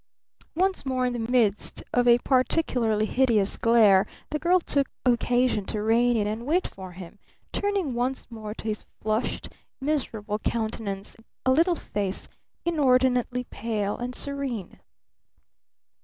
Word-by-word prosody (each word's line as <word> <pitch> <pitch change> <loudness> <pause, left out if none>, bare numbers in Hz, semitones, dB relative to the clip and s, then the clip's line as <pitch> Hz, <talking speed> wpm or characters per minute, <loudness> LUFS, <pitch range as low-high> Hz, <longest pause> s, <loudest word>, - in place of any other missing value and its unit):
Once 380 +2 +1
more 260 -2 0
in 250 - 0
the 240 - -3
midst 220 -5 +1
of 245 0 +3
a 240 0 +7
particularly 250 -4 +1
hideous 225 -5 +2
glare 215 -5 +5 0.2
the 300 - -1
girl 355 +4 +4
took 280 -5 0 0.2
occasion 245 -2 +2
to 210 +2 -2
rein 235 +2 +3
in 210 - +1
and 220 +4 -3
wait 350 +5 +2
for 185 -2 -8
him, 185 +2 -11 0.3
turning 400 -9 0
once 250 +2 -1
more 215 -2 -6
to - - -9
his 215 -1 -3 0.2
flushed, 215 +2 -2 0.3
miserable 230 -8 -2
countenance 215 -3 -3 0.3
a 260 - +4
little 335 +6 +4
face 200 - -3 0.4
inordinately 255 -5 +2
pale 210 -3 -2
and 245 +1 -5
serene. 275 -9 -3
240 Hz, 135 wpm, -26 LUFS, 215-265 Hz, 0.4 s, a